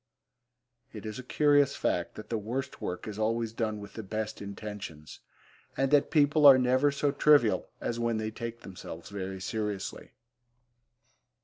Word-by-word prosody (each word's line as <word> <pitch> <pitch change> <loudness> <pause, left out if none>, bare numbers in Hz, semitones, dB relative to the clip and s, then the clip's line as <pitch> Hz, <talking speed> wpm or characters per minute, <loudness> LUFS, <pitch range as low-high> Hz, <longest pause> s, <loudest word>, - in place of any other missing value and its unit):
It 110 -1 -8
is 110 +2 -5
a - - -7
curious 145 +1 +3
fact 85 -1 -1
that 110 - -9
the 115 - 0
worst 120 +6 -4
work 90 +4 -4
is 105 0 -6
always 115 +1 0
done 110 -2 -2
with 100 0 -10
the 110 - -6
best 110 +1 -4
intentions, 100 -6 -8 0.6
and 135 0 +1
that 145 -1 +4
people 150 -1 +5
are 135 -2 +10
never 130 +3 +3
so 140 0 0
trivial 145 -5 +4
as 120 - -3
when 115 -1 0
they 110 0 -3
take 115 +1 -6
themselves 90 -1 -9
very 95 -1 -5
seriously. 105 -1 -4
110 Hz, 155 wpm, -29 LUFS, 105-130 Hz, 0.6 s, are